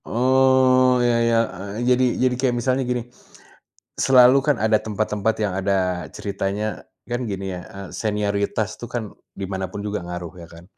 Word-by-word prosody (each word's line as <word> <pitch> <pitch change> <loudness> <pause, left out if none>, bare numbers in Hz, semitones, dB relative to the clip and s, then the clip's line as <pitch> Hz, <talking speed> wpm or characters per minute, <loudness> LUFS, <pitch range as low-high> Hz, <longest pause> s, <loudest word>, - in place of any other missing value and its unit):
Oh, 130 0 +4
ya 120 -1 +2
ya, 115 - +2 0.2
eee, 100 +5 -5
jadi 125 0 +4
jadi 130 0 +2
kayak 130 -2 +1
misalnya 130 +2 0
gini, 125 -1 0 1.0
selalu 130 0 +6
kan 145 -3 +3
ada 110 0 +3
tempat-tempat 105 0 -1
yang 105 -3 0
ada 95 -2 0
ceritanya, 100 +1 -3 0.2
kan 120 +1 -1
gini 95 -2 -4
ya, 90 -1 -5
eee, 100 -1 -9
senioritas 105 0 -2
tuh 120 - -7
kan 120 0 -4 0.3
di - - -8
mana 95 0 -2
pun 100 - -7
juga 105 0 -3
ngaruh, 90 -1 -6
ya 85 - -10
kan. 85 +1 -13
110 Hz, 165 wpm, -22 LUFS, 100-125 Hz, 1.0 s, selalu